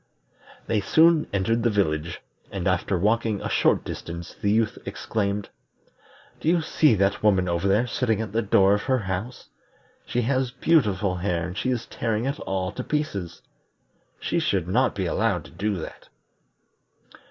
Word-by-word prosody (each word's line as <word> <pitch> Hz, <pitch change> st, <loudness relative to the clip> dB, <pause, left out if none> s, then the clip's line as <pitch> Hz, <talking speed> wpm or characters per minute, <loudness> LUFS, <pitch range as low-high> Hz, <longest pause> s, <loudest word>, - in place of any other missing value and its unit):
They 105 Hz, -, 0 dB
soon 160 Hz, -, +4 dB
entered 105 Hz, +4 st, +1 dB
the 120 Hz, -, +2 dB
village, 85 Hz, -6 st, -1 dB, 0.3 s
and -, -, -3 dB
after 95 Hz, -, +1 dB
walking 110 Hz, +2 st, +1 dB
a -, -, -4 dB
short -, -, +2 dB
distance 85 Hz, 0 st, -7 dB
the 100 Hz, -, +1 dB
youth 110 Hz, +3 st, +1 dB
exclaimed: 100 Hz, -2 st, -2 dB, 0.9 s
"Do 155 Hz, -, 0 dB
you 170 Hz, -1 st, +3 dB
see 155 Hz, -5 st, +3 dB
that 100 Hz, +1 st, +1 dB
woman 95 Hz, -4 st, +3 dB
over 85 Hz, +2 st, 0 dB
there 105 Hz, +5 st, +3 dB
sitting 115 Hz, -2 st, 0 dB
at 110 Hz, -3 st, -4 dB
the 115 Hz, +2 st, +1 dB
door 100 Hz, -2 st, +4 dB
of 105 Hz, -, +1 dB
her 130 Hz, -, +4 dB
house? 100 Hz, +3 st, -5 dB, 0.6 s
She 125 Hz, -, 0 dB
has 130 Hz, +1 st, +1 dB
beautiful 105 Hz, -, +1 dB
hair 85 Hz, -2 st, -1 dB
and 90 Hz, -, -6 dB
she 130 Hz, -, -1 dB
is 120 Hz, -2 st, -1 dB
tearing 115 Hz, 0 st, -2 dB
it 140 Hz, +1 st, -2 dB
all 95 Hz, -1 st, -2 dB
to -, -, -5 dB
pieces. 100 Hz, -, -3 dB, 0.8 s
She -, -, -1 dB
should -, -, 0 dB
not -, -, +2 dB
be -, -, -1 dB
allowed -, -, 0 dB
to -, -, -13 dB
do 100 Hz, +4 st, -2 dB
that." 85 Hz, -, -8 dB
105 Hz, 165 wpm, -25 LUFS, 95-120 Hz, 0.9 s, soon